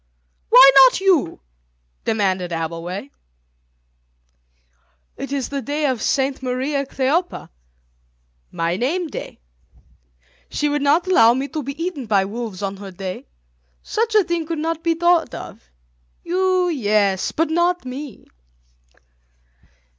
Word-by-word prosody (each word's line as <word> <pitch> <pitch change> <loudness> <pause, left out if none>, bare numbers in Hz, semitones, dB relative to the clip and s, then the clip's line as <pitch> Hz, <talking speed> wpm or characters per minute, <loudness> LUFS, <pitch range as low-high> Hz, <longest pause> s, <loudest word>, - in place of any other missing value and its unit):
"Why 275 - +9
not 265 +2 +7
you?" 370 - +1 0.6
demanded 190 -4 0
Abbleway. 165 0 -5 2.0
"It 275 - -7
is 275 -3 -2
the 280 -1 -3
day 295 +4 -2
of 260 -5 -1
Saint 270 +2 0
Mariä 265 +2 -2
Kleophä, 300 +8 -1 1.0
my 170 +2 -1
name 325 - -1
day. 305 - -8 1.1
She 295 - -1
would 290 0 -1
not 295 +5 +3
allow 235 -11 +5
me 270 +2 -2
to 310 -1 -4
be 280 +2 -7
eaten 330 -8 -4
by 200 -2 +2
wolves 210 -2 -6
on 195 0 -3
her 200 0 -9
day. 185 0 -7 0.6
Such 445 0 -1
a 420 - +6
thing 340 -2 -3
could 330 -1 -3
not 325 +1 -2
be 335 -1 +1
thought 345 0 +2
of. - - -10 0.5
You, 370 0 +1
yes, 205 - +1
but 325 0 -1
not 345 -1 +1
me." 260 -1 -8
275 Hz, 125 wpm, -20 LUFS, 210-330 Hz, 2.0 s, Why